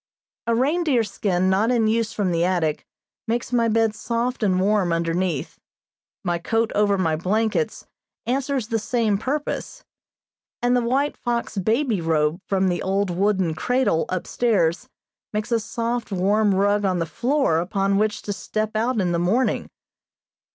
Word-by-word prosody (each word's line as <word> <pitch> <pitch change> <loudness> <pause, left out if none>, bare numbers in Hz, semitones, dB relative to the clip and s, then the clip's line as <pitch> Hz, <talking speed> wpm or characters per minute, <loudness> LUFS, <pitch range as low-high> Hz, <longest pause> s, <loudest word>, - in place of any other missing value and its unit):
A 230 - +2
reindeer 280 -1 +2
skin 190 -3 0
not 195 +4 +2
in 235 -3 +2
use 225 0 +1
from 195 -4 -1
the 170 0 +1
attic 175 -4 0 0.4
makes 235 +2 -2
my 235 -1 +3
bed 225 -1 +2
soft 235 +3 -2
and 190 -4 +2
warm 195 -2 +2
underneath, 165 -1 -1 0.6
my 175 -2 -1
coat 225 +5 0
over 205 -1 +2
my 165 -4 +1
blankets 215 - -1 0.4
answers 260 -1 -1
the 225 -2 0
same 215 -2 0
purpose, 295 - -3 0.8
and 245 +1 +2
the 245 - +3
white 265 +5 0
fox 235 -1 -3
baby 220 +1 +1
robe 160 0 +1
from 190 -1 +1
the 175 -1 0
old 195 0 0
wooden 190 -2 +1
cradle 245 -2 +1
upstairs 185 -2 0 0.4
makes 215 +3 -3
a 230 - +3
soft, 230 +1 -3
warm 200 +2 +2
rug 205 +1 +2
on 185 -2 +1
the 165 - 0
floor 240 - +1
upon 195 +3 0
which 210 0 0
to 205 - -3
step 215 +2 -3
out 230 +2 +1
in 180 -3 +1
the 170 - 0
morning. 210 +10 +1
210 Hz, 155 wpm, -23 LUFS, 185-235 Hz, 0.8 s, my